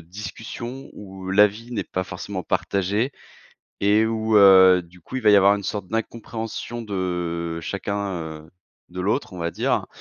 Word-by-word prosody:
discussion 115 Hz, +8 st, -8 dB
où 95 Hz, -2 st, -9 dB
l'avis 105 Hz, +4 st, +3 dB
n'est 110 Hz, -, -2 dB
pas 95 Hz, 0 st, -3 dB
forcément 95 Hz, +1 st, -6 dB
partagé 100 Hz, +9 st, 0 dB, 0.7 s
et 105 Hz, +2 st, +4 dB
où, 110 Hz, -1 st, +1 dB
heu, 95 Hz, -2 st, +8 dB
du 90 Hz, +1 st, -19 dB
coup, 125 Hz, -, -7 dB
il 130 Hz, -, -3 dB
va 105 Hz, -, +6 dB
y 105 Hz, -, +7 dB
avoir 100 Hz, +1 st, +6 dB
une 100 Hz, -, -4 dB
sorte 100 Hz, -3 st, -3 dB
d'incompréhension 115 Hz, +1 st, -4 dB
de 90 Hz, -4 st, -3 dB
chacun, 100 Hz, +3 st, -3 dB, 0.3 s
heu, 80 Hz, -, -19 dB, 0.4 s
de 90 Hz, +1 st, -6 dB
l'autre, 105 Hz, +4 st, -1 dB
on -, -, -8 dB
va 85 Hz, 0 st, -2 dB
dire -, -, 0 dB
100 Hz, 160 wpm, -23 LUFS, 90-110 Hz, 0.7 s, heu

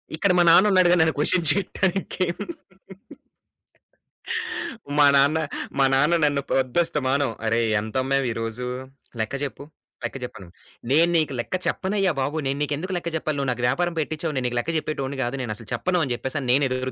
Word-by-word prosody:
ఇక్కడ 185 Hz, +4 st, +2 dB
మా 175 Hz, -, +5 dB
నాన్నున్నాడుగా 185 Hz, 0 st, +6 dB
నన్ను 160 Hz, 0 st, +3 dB
క్వషన్ 170 Hz, +2 st, +3 dB
చేయటానికి. 190 Hz, 0 st, -1 dB, 2.7 s
మా 145 Hz, -, +7 dB
నాన్న, 140 Hz, +3 st, +4 dB, 0.4 s
మా 135 Hz, -, +5 dB
నాన్న 150 Hz, +6 st, +4 dB
నన్ను 145 Hz, -1 st, +2 dB
పొద్దస్తమానం 135 Hz, 0 st, +1 dB, 0.2 s
"అరేయి! 115 Hz, 0 st, +1 dB
ఎంతమ్మావు 130 Hz, +5 st, -1 dB
ఈరోజు? 115 Hz, +2 st, -4 dB, 0.5 s
లెక్క 110 Hz, +5 st, -2 dB
జేప్పు. 140 Hz, 0 st, -5 dB, 0.4 s
లెక్క -, -, -4 dB
జెప్పనడు" 95 Hz, -7 st, -9 dB, 0.4 s
నేను 165 Hz, +4 st, +5 dB
నీకు 155 Hz, -3 st, 0 dB
లెక్క 120 Hz, -, -3 dB
చెప్పనయ్యా 195 Hz, -1 st, 0 dB
బాబు. 145 Hz, +4 st, -2 dB
నేను 135 Hz, +1 st, -1 dB
నీకెందుకు 150 Hz, +6 st, -3 dB
లెక్క 170 Hz, -1 st, -3 dB
జెప్పాలి? 155 Hz, -1 st, -2 dB
నువ్వు 140 Hz, -2 st, -1 dB
నాకు 120 Hz, 0 st, -4 dB
వ్యాపారం 175 Hz, +7 st, 0 dB
పెట్టిచ్చావు 155 Hz, +1 st, -2 dB
నేను 130 Hz, -, -1 dB
నీకు 120 Hz, 0 st, -3 dB
లెక్క 160 Hz, -, -2 dB
చెప్పేటోడిని 140 Hz, -3 st, -3 dB
కాదు 120 Hz, +2 st, -2 dB
నేను 120 Hz, -4 st, -4 dB
అసల 110 Hz, +1 st, -8 dB
చెప్పను, 180 Hz, -1 st, 0 dB
అని 135 Hz, -, -3 dB
చెప్పేసని 130 Hz, +2 st, -3 dB
నేను 135 Hz, +3 st, +4 dB
ఎదురు 130 Hz, 0 st, -2 dB
140 Hz, 155 wpm, -24 LUFS, 130-170 Hz, 2.7 s, మా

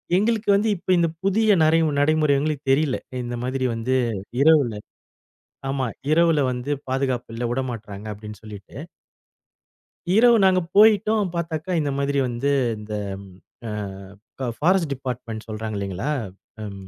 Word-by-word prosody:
எங்களுக்கு 215 Hz, +2 st, +1 dB
வந்து 210 Hz, +3 st, +1 dB
இப்ப 175 Hz, -, -12 dB
இந்த 170 Hz, -, +3 dB, 0.2 s
புதிய 210 Hz, +1 st, +3 dB
நரை 160 Hz, +1 st, +4 dB, 0.2 s
நடைமுறை 150 Hz, 0 st, +3 dB
எங்களுக்கு 150 Hz, -1 st, -2 dB
தெரியில. 140 Hz, -1 st, +2 dB, 0.3 s
இந்த 120 Hz, 0 st, -4 dB
மாதிரி 130 Hz, 0 st, -1 dB
வந்து 120 Hz, +3 st, -1 dB, 0.5 s
இரவுல 145 Hz, -6 st, +5 dB, 1.0 s
ஆமா. 135 Hz, -2 st, -1 dB, 0.2 s
இரவுல 165 Hz, -1 st, +4 dB
வந்து 125 Hz, +3 st, -4 dB, 0.2 s
பாதுகாப்பு 130 Hz, -3 st, -1 dB
இல்ல. 120 Hz, -, -4 dB
உட 130 Hz, -, 0 dB
மாட்றாங்க 105 Hz, -3 st, -8 dB
அப்படின்னு 105 Hz, 0 st, -10 dB
சொல்லிட்டு. 105 Hz, 0 st, -11 dB, 1.4 s
இரவு 235 Hz, +1 st, +6 dB
நாங்க 185 Hz, -1 st, +4 dB, 0.2 s
போயிட்டோம், 210 Hz, -1 st, +5 dB
பார்த்தாக்க 170 Hz, +1 st, -2 dB
இந்த 145 Hz, -1 st, -1 dB
மாதிரி 140 Hz, 0 st, 0 dB
வந்து, 125 Hz, +4 st, -1 dB, 0.3 s
இந்த 105 Hz, 0 st, -8 dB, 0.7 s
அ -, -, -4 dB, 0.7 s
ப 130 Hz, -, -2 dB
பாரஸ்ட் 175 Hz, -2 st, +2 dB
டிபார்ட்மென்ட் 125 Hz, -4 st, -6 dB
சொல்றாங்க 110 Hz, 0 st, -5 dB
இல்லைங்களா? 100 Hz, +5 st, -3 dB, 0.5 s
ம். 100 Hz, -2 st, -8 dB
140 Hz, 130 wpm, -23 LUFS, 115-170 Hz, 1.4 s, இரவு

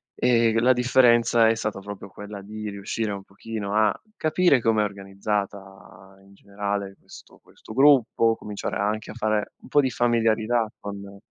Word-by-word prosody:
Ehm, 115 Hz, -2 st, +3 dB
la 130 Hz, +2 st, +5 dB
differenza 120 Hz, -2 st, +4 dB
è 115 Hz, -, +2 dB
stata 105 Hz, -2 st, -3 dB
proprio 100 Hz, 0 st, -9 dB
quella 105 Hz, +1 st, -9 dB
di 105 Hz, +1 st, -7 dB
riuscire 105 Hz, +2 st, -3 dB
un 100 Hz, -1 st, -6 dB
pochino 100 Hz, 0 st, -6 dB
a 110 Hz, -1 st, +3 dB, 0.2 s
capire 155 Hz, -2 st, +3 dB
com'è 110 Hz, -2 st, +2 dB
organizzata 100 Hz, -1 st, -5 dB
in 100 Hz, 0 st, -20 dB
generale 100 Hz, 0 st, -4 dB
questo -, -, -16 dB
questo -, -, -14 dB
gruppo, 125 Hz, -4 st, +4 dB
cominciare 105 Hz, -2 st, -5 dB
anche 105 Hz, +2 st, -2 dB
a -, -, -9 dB
fare 110 Hz, -2 st, -1 dB
un -, -, -14 dB
po' 145 Hz, -, +4 dB
di 130 Hz, -, 0 dB
familiarità 115 Hz, -1 st, +1 dB
con 100 Hz, -1 st, -8 dB
105 Hz, 155 wpm, -24 LUFS, 100-115 Hz, 0.2 s, la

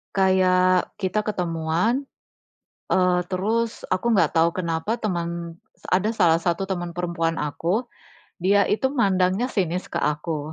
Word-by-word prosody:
kayak 185 Hz, -1 st, +3 dB
kita 190 Hz, +2 st, 0 dB
ketemuan, 180 Hz, -, 0 dB, 0.9 s
eee, 180 Hz, -1 st, +3 dB
terus 220 Hz, +5 st, -1 dB
aku 185 Hz, +6 st, +1 dB
nggak 200 Hz, -3 st, +2 dB
tahu 165 Hz, +1 st, +4 dB
kenapa 175 Hz, +6 st, -2 dB
teman 170 Hz, -4 st, -3 dB, 0.3 s
ada 195 Hz, +4 st, +2 dB
salah 175 Hz, -7 st, +4 dB
satu 175 Hz, +3 st, -1 dB
teman 175 Hz, -2 st, -3 dB
perempuan 170 Hz, -2 st, -2 dB
aku, 170 Hz, -, -1 dB, 0.6 s
dia 200 Hz, +2 st, +4 dB
itu 265 Hz, +5 st, +1 dB
mandangnya 195 Hz, -3 st, +2 dB
sinis 180 Hz, -6 st, -1 dB
ke -, -, -3 dB
aku. 150 Hz, +1 st, -2 dB
185 Hz, 125 wpm, -23 LUFS, 170-200 Hz, 0.9 s, tahu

